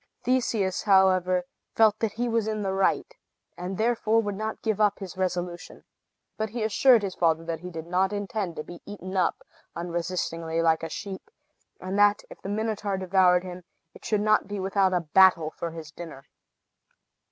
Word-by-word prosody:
Theseus, 230 -7 0
however, 185 -2 +3 0.3
felt 220 -1 +4
that 220 -3 -1
he 240 +2 -2
was 230 -2 0
in 215 -1 -2
the 190 -1 -1
right, 195 0 +1 0.5
and 180 +2 -5
therefore 225 -1 +2
would 205 -2 -1
not 215 +2 -5
give 215 -2 0
up 205 -1 +3
his 190 -3 -8
resolution. 180 -2 -4 0.5
But 220 0 -2
he 230 +1 -3
assured 225 +1 +4
his 195 -2 -3
father 165 -1 +1
that 165 -1 -3
he 180 +2 -8
did 165 -2 -7
not 185 +3 +1
intend 200 -3 -3
to 150 - -5
be 175 - -11
eaten 195 -2 -7
up, 185 - 0 0.3
unresistingly, 170 -1 -3
like 160 -1 +3
a 165 - -4
sheep, 195 - -7 0.5
and 190 +2 -3
that, 205 0 +4
if - - -12
the 195 - -6
Minotaur 210 -2 -2
devoured 185 -1 +3
him, 180 -1 -8 0.3
it - - -16
should 210 -2 0
not 215 -1 +3
be 205 0 -4
without 190 0 +1
a 180 -1 +1
battle 170 -1 +4
for 170 - -5
his 160 -2 -9
dinner. 155 -4 -10
190 Hz, 180 wpm, -26 LUFS, 175-210 Hz, 0.5 s, felt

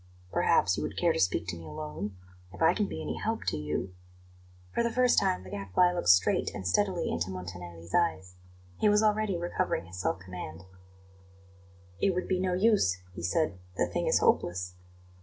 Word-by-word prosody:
"Perhaps - - +3
you - - -2
would - - -5
care - - +3
to - - -2
speak 90 -2 +1
to 85 - -3
me 85 - -10
alone? 80 +6 -6 0.4
If 95 - -12
I 165 +2 +5
can 205 0 0
be 80 - -5
any 75 +1 -3
help - - -2
to - - -3
you 75 +5 -3 0.4
" 90 0 -26
For - - +1
the 235 - +1
first 250 +1 +4
time 90 0 0
the 95 - -11
Gadfly 100 - +2
looked 175 - 0
straight 90 +1 +4
and 95 - -4
steadily 185 - +1
into 85 +2 -1
Montanelli's 90 -2 -8
eyes; 95 - +1 0.5
he 210 - +4
was 210 +1 +4
already 210 -3 +2
recovering 175 - -1
his 90 +2 -9
self 80 -1 0
command. 90 -3 -8 1.4
"It 190 -2 +2
would 180 - -2
be 185 -1 +1
no 185 -1 0
use," 195 - +3 0.2
he - - -7
said; 95 - 0 0.2
"the - - +3
thing - - -2
is - - +4
hopeless." 90 +1 +1
95 Hz, 195 wpm, -29 LUFS, -, 1.4 s, I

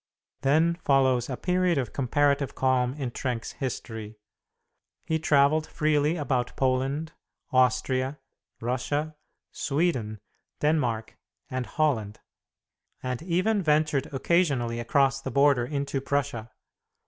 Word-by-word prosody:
Then 160 +5 +2
follows 130 -3 +3
a 130 - -3
period 180 -2 +1
of 125 -5 -2
comparative 140 +1 +1
calm 130 -1 +1
in 135 -5 -4
Trenck's 120 -2 -3
history. 110 -5 -5 0.9
He 160 0 0
travelled 155 0 +3
freely 150 0 +1
about 130 -5 -1
Poland, 135 +4 0 0.4
Austria, 130 +2 +2 0.4
Russia, 145 +6 -2 0.4
Sweden, 135 -8 -1 0.4
Denmark 125 -8 0 0.3
and 130 -1 -3
Holland, 115 -10 0 0.8
and 125 -1 -3
even 185 +5 +1
ventured 150 -3 +1
occasionally 135 -6 +1
across 135 +3 +2
the 135 - -4
border 140 -2 +3
into 140 -1 -2
Prussia. 140 -5 -2
135 Hz, 105 wpm, -27 LUFS, 125-150 Hz, 0.9 s, follows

